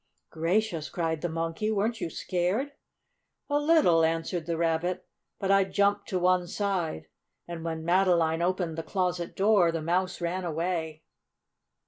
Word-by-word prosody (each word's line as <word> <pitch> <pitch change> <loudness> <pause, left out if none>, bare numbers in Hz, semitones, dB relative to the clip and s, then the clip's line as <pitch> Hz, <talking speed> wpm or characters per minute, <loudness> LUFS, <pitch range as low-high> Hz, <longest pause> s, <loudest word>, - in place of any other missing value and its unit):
"Gracious!" 170 0 0
cried 160 -3 -2
the 175 - -1
Monkey. 165 +5 -2
"Weren't 220 +2 0
you - - -2
scared?" 185 - -1 0.8
"A 290 - +3
little," 295 - +4
answered 165 +1 -1
the 170 -1 -1
Rabbit. 170 +2 0 0.3
"But 195 0 -1
I 195 0 +5
jumped 200 +1 +1
to 185 - 0
one 180 0 +2
side, 180 - -2 0.4
and 170 -1 -6
when 160 -1 -4
Madeline 170 -2 +3
opened 175 -2 -1
the - - -1
closet 180 0 -2
door 195 -4 +4
the 165 - -2
mouse 180 +4 -1
ran 180 +2 -2
away." 160 -1 -3
175 Hz, 145 wpm, -28 LUFS, 165-195 Hz, 0.8 s, I